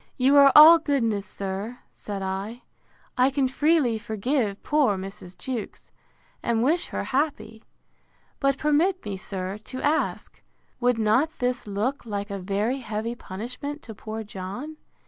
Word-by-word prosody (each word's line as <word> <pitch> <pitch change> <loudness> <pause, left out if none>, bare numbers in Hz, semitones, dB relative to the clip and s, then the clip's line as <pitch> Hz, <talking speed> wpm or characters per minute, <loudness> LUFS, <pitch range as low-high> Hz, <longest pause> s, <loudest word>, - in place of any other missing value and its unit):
You 270 +2 +4
are 280 -1 +8
all 320 +3 +10
goodness, 230 -10 0
sir, 200 +5 -5
said 200 -2 -6
I. 195 +5 -4 0.6
I 255 +2 +5
can 275 -1 +1
freely 275 -4 +2
forgive 220 0 -2
poor 285 -10 +2
Mrs. 190 -1 -8
Jewkes, 245 -5 -6 0.5
and 230 -1 +1
wish 325 +7 +1
her - - -3
happy. 270 -5 -2 0.8
But 275 -1 +2
permit 320 +6 +1
me, 205 -2 -3
sir, 190 +1 -5
to 255 - -6
ask, 305 +2 -1 0.4
Would 245 -1 +2
not 250 +9 +2
this 250 -3 -2
look 215 +8 -2
like 205 -3 -4
a 200 - -3
very 205 +7 -1
heavy 225 -1 -3
punishment 250 +8 -7
to 225 - -8
poor 220 +2 -6
John? 210 +10 -7
235 Hz, 145 wpm, -25 LUFS, 205-280 Hz, 0.8 s, all